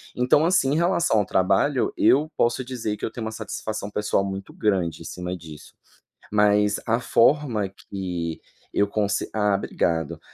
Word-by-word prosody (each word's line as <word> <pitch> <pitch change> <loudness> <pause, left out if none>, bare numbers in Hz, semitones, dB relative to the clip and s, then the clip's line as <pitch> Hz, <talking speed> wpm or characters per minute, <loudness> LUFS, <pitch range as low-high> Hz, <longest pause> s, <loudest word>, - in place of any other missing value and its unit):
Então 125 +5 +3
assim 170 -6 +3
em - - +1
relação 170 - +2
ao 105 - +1
trabalho, 95 +10 +1
eu 150 +4 +4
posso 120 +2 +1
dizer 120 -4 -3
que - - -5
eu 110 - -4
tenho 115 -1 -6
uma 110 - -3
satisfação 110 -1 -5
pessoal 105 -1 0
muito 95 0 -6
grande 95 -7 0
em 85 - -9
cima 90 +1 -5
disso. 80 -4 -12 0.6
Mas 105 0 +3
a 115 +2 +2
forma 115 -4 +2
que 90 -4 -5 0.3
eu 100 - +2
cons 100 0 0
Ah, 105 -2 +2
obrigado. 80 -5 -1
105 Hz, 165 wpm, -24 LUFS, 95-120 Hz, 0.6 s, eu